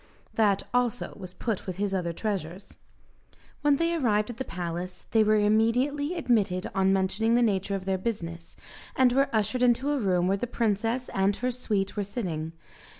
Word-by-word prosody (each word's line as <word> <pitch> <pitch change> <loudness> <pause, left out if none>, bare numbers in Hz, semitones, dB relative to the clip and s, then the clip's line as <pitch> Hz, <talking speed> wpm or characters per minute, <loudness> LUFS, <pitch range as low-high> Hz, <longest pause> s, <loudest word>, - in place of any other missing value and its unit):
That 205 -3 +2
also 245 -1 0
was 185 -2 -9
put 220 -5 -3
with 185 - -3
his 200 0 -1
other 175 -3 -1
treasures. 190 -1 -4 0.9
When 290 -1 +4
they 335 +3 +1
arrived 225 -8 +1
at 235 - -11
the 265 - -2
palace, 175 -2 -5
they 220 -1 +5
were 215 0 +3
immediately 245 +9 +2
admitted 210 - +1
on 190 0 +3
mentioning 195 +4 +2
the 245 - +4
nature 200 -2 0
of 190 -1 -5
their 190 -1 0
business, 170 -6 -5 0.4
and 255 -2 +4
were 275 +2 +3
ushered 220 +3 0
into 250 +3 +3
a 290 - 0
room 180 -5 +1
where 195 +1 +2
the 245 - -3
princess 230 +2 -1
and 195 +1 +1
her 250 +1 -1
suite 210 -5 -2
were 205 - -1
sitting. 170 -7 -4
210 Hz, 180 wpm, -27 LUFS, 190-245 Hz, 0.9 s, they